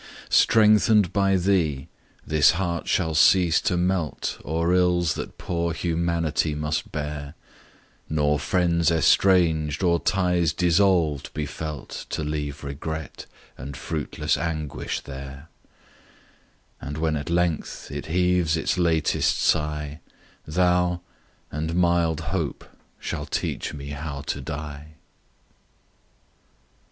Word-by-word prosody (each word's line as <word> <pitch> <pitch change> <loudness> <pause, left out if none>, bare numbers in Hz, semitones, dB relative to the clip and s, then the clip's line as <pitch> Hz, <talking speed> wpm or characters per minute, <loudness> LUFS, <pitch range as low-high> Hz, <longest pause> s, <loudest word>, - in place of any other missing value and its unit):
Strengthen'd 105 -3 +5
by 100 -1 +3
thee, 85 -7 +1 0.4
this 75 -1 +4
heart 85 -1 -2
shall 80 -4 +1
cease 85 +2 +5
to 90 - 0
melt 90 -3 -1
O'er 85 +3 0
ills 90 -2 +2
that - - -7
poor 85 -1 -2
humanity 85 -2 0
must 75 +1 -2
bear; 75 -1 -5 0.7
Nor 75 -1 +1
friends 85 +2 +2
estranged, 80 -2 +3
or 85 -2 +3
ties 90 -4 +1
dissolved 85 -4 +2
be 75 - -2
felt 75 -1 -6
To - - -3
leave 75 -1 -4
regret, 75 +2 -6 0.3
and 70 +1 -7
fruitless 75 0 -2
anguish 80 -4 -3
there: 70 +2 -9 1.3
And 75 +2 -5
when 80 0 0
at 75 +1 -4
length 85 -2 -1
it - - -5
heaves 90 -1 +2
its 80 - -1
latest 80 -3 +2
sigh, 75 0 0 0.5
Thou 90 +1 +2 0.5
and 80 +2 -3
mild 85 -2 +2
Hope - - -2 0.3
shall - - -4
teach - - -2
me 70 -1 -7
how 70 0 -5
to - - -4
die. 75 +1 -7
80 Hz, 110 wpm, -24 LUFS, 75-90 Hz, 1.3 s, Strengthen'd